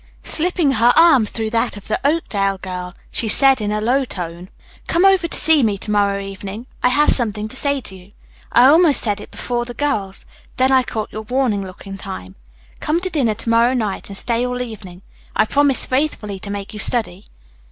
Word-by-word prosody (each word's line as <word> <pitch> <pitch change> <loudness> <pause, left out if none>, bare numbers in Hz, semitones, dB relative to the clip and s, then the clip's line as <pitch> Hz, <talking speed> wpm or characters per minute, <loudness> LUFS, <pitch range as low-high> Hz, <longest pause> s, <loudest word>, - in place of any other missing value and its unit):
Slipping 340 -3 +1
her 240 -1 +4
arm 320 -10 +6
through 220 0 -4
that 230 -2 -1
of 200 - -12
the 215 - -1
Oakdale 205 -10 0
girl, 180 -1 -7 0.2
she 230 - -2
said 270 +3 +4
in 210 0 -2
a 210 - -1
low 250 +6 +1
tone, 175 -5 -6 0.4
"Come 345 +3 +2
over 385 -3 +4
to - - 0
see 320 -2 +4
me 210 -4 +1
to 210 - -5
morrow 200 -1 +1
evening. 195 +3 -7 0.2
I - - +3
have 295 +4 +3
something 215 -3 +2
to 260 - -7
say 280 0 0
to 195 - -9
you. 185 +1 -15 0.4
I 240 - +6
almost 310 +1 +5
said 205 -2 -1
it - - -11
before 240 -1 -3
the 240 0 -9
girls; 210 -10 -2 0.3
then 260 +1 +2
I 260 -1 +5
caught 220 -3 -5
your 215 - -6
warning 240 -2 -1
look 185 0 -11
in 195 0 -8
time. 95 - -8 0.5
Come 315 +3 0
to 370 0 -2
dinner 245 -10 0
to 230 - -3
morrow 235 +3 +3
night 215 -6 -3
and 195 - -7
stay 235 +2 -1
all 250 0 -2
evening. 195 -6 -10 0.3
I - - +3
promise 280 +2 +3
faithfully 255 -8 -2
to 200 - -9
make 200 0 -6
you 210 - -7
study." 215 -5 0
225 Hz, 210 wpm, -19 LUFS, 200-270 Hz, 0.5 s, arm